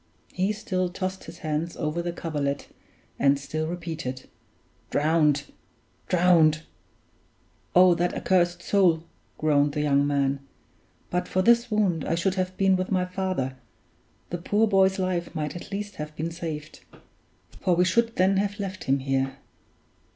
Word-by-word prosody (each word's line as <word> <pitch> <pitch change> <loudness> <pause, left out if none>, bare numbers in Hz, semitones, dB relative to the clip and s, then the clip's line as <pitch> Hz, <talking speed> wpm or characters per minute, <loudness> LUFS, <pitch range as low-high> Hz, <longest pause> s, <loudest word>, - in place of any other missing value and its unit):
He 190 +3 +1
still 185 -4 -2
tossed 185 +1 -4
his 170 - -10
hands 155 +2 -2
over 155 +1 -1
the 175 0 -3
coverlet, 145 -4 -3 0.5
and 140 0 +4
still 155 +3 -3
repeated, 160 -7 -5 0.6
"Drowned! 150 -1 +2 0.6
drowned!" 165 -3 +4 1.1
"Oh, 180 0 +7
that 175 +1 0
accursed 175 -1 +1
Soule!" 175 -5 +3 0.3
groaned 145 -2 +2
the 150 - -1
young 140 -1 +3
man. 140 -1 +1 0.7
"But 180 0 -1
for 185 - +1
this 235 +2 +4
wound 195 -8 +1
I - - 0
should 180 +3 +1
have 185 -1 -2
been 195 -1 +4
with 185 0 -2
my 185 -2 +1
father. 180 -8 -2 0.7
The 175 - -3
poor 210 +5 +2
boy's 190 -1 +3
life 180 -2 -2
might 150 -1 -3
at 175 - -8
least 205 +1 -5
have 150 0 -6
been 160 +2 -3
saved; 155 -3 -6 0.8
for 180 -2 +2
we 180 +1 +3
should 230 +5 +1
then 190 +1 +3
have 205 +1 -1
left 190 -2 -5
him 135 +1 +3
here." 135 0 -1
175 Hz, 150 wpm, -26 LUFS, 150-185 Hz, 1.1 s, Oh